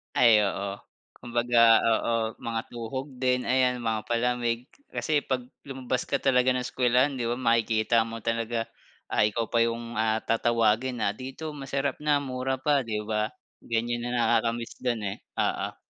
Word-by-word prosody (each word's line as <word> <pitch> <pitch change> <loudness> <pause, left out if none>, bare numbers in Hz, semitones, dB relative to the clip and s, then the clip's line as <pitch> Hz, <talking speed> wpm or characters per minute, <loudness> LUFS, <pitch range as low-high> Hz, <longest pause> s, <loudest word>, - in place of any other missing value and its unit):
Ay 115 -3 +6
oo. 100 +1 -4 0.4
Kumbaga 120 0 +1 0.2
oo, 115 +1 +2 0.3
mga 115 -1 -3
tuhog 120 +4 -5
din 125 -1 +1
ayan 125 -1 +1
mga 110 -1 0
palamig 120 0 0 0.3
kasi 155 -2 +1
'pag 130 -2 -2 0.2
lumabas 130 -1 -3
ka - - 0
talaga 130 -1 +4
ng 125 - 0
eskuwelahan 125 +2 +2
'di 115 - -1
ba 120 - 0
makikita 115 -1 +2
mo 115 -1 -7
talaga. 115 0 -1 0.5
Ah, 105 - +3
ikaw 115 +1 -3
pa 115 - +2
'yong, 115 -1 -1
ah, 110 0 +1
tatawagin 115 +2 +1
na 100 - +2
dito 135 +7 -7
masarap 140 -1 -3
na 145 -1 +1
mura 130 0 -2
pa, 140 +2 +2
'di 110 -4 -3
ba? 105 0 0 0.3
Ganyan 120 +1 -2
na 120 - -2
nakaka-miss 115 0 0
do'n 120 -3 -1
eh. 100 -1 -3 0.2
Oo. - - -1
120 Hz, 160 wpm, -27 LUFS, 115-130 Hz, 0.5 s, Ay